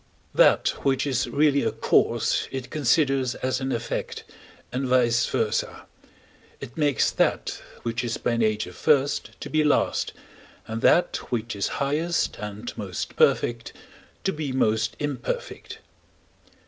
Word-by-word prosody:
That - - +5
which 135 0 +1
is 135 -3 0
really 145 -1 +3
a - - 0
cause - - +1
it 130 -2 -6
considers 135 -3 +2
as 130 +1 -2
an 130 0 -2
effect, 115 - -3 0.5
and 130 +1 -2
vice 120 -2 +3
versâ: - - -1 0.8
it 120 - -9
makes 145 -3 +2
that - - 0 0.2
which 115 +1 -2
is 115 -1 -2
by 120 - 0
nature 110 -2 0
first 145 -2 +1
to - - -5
be 155 0 +3
last, 150 - +1 0.5
and 110 0 -5
that 175 - +4
which 115 -2 -2
is 100 - -1
highest 155 +5 0
and 105 +2 -6
most 95 -5 -5
perfect 120 -1 +2 0.5
to 190 - 0
be 150 -3 -3
most 110 -4 +1
imperfect. 145 -4 -4
130 Hz, 135 wpm, -25 LUFS, 115-145 Hz, 0.8 s, That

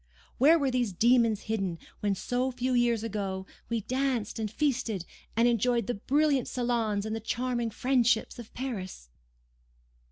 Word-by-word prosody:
Where 305 +6 +7
were 275 -4 0
these 245 -5 0
demons 230 +1 +3
hidden 195 -6 -2 0.2
when, 205 -1 0
so 250 +6 -1
few 255 +1 -1
years 240 -2 +2
ago, 195 -4 -3 0.2
we 230 -1 0
danced 255 -2 -1
and 215 -1 -2
feasted, 235 - -1 0.3
and 230 +2 +4
enjoyed 240 -1 +2
the 245 - -1
brilliant 280 +4 +1
salons 230 -4 0
and 220 0 -2
the - - -3
charming 240 +1 -1
friendships 245 -1 +1
of 235 - -10
Paris? 195 - -5
235 Hz, 150 wpm, -29 LUFS, 215-255 Hz, 0.3 s, Where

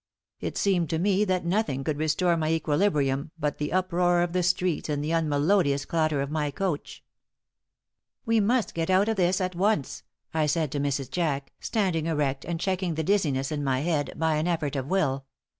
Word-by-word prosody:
It - - -4
seemed 180 -5 +1
to 160 - 0
me 200 +4 +2
that 185 -3 0
nothing 170 -7 0
could 150 0 -2
restore 170 +3 +2
my 155 -1 -1
equilibrium 150 -3 +1
but 150 -2 -2
the 150 - -2
uproar 175 -1 +2
of 175 -1 -3
the 185 - +2
streets 180 -2 0
and 145 -1 -1
the 155 - -2
unmelodious 150 -1 +2
clatter 155 -3 0
of 140 +1 -3
my 150 -2 0
coach. 170 0 -4 1.2
"We 230 0 +3
must 230 +3 +1
get 165 +1 -2
out 190 +2 +4
of 225 - +1
this 185 +1 +2
at 185 -1 -1
once," 175 -7 0 0.3
I 155 -1 +1
said 155 -1 0
to 145 - -2
Mrs. 140 -2 -2
Jack, 145 -5 -1
standing 180 -8 0
erect 145 -4 -1
and 170 -1 -3
checking 185 -2 -1
the 160 - -1
dizziness 150 -8 +1
in 145 -1 -2
my 130 -1 0
head 155 -3 -1
by 160 -1 +1
an 155 +3 0
effort 155 -5 -1
of 135 -1 -2
will. 140 -7 0
160 Hz, 190 wpm, -26 LUFS, 145-185 Hz, 1.2 s, out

